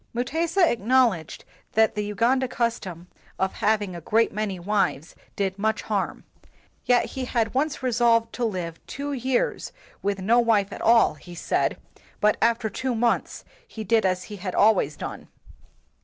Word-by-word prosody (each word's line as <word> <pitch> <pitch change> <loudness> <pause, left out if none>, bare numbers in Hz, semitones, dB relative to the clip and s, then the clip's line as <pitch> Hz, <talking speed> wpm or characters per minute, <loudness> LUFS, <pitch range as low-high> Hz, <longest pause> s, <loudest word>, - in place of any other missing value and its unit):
Mutesa 330 +8 +1
acknowledged 230 - +1 0.3
that 220 0 +3
the 210 - -2
Uganda 235 +6 +1
custom 220 -8 -3 0.3
of 190 0 0
having 205 -4 0
a 170 - -7
great 225 +7 +2
many 205 -2 -2
wives 180 -5 -1 0.2
did 195 -1 -2
much 220 +1 0
harm; 205 -3 -2 0.6
yet 245 -1 +3
he 260 -1 -5
had 230 -3 -1
once 280 +1 -1
resolved 230 -2 +2
to 245 - -3
live 180 -7 -3
two 285 +1 -4
years 255 -1 -1 0.3
with 200 0 -1
no 225 +6 +3
wife 220 -4 +2
at - - -8
all, 230 0 +5
he 175 +4 -12
said, - - 0 0.4
but 210 0 +3
after 230 -1 +2
two 250 +4 -3
months 235 +1 0 0.2
he 220 - -7
did 220 +2 +2
as 185 -1 0
he 210 - -9
had 185 -1 -5
always 200 -9 +3
done. - - -7
220 Hz, 155 wpm, -25 LUFS, 195-240 Hz, 0.6 s, all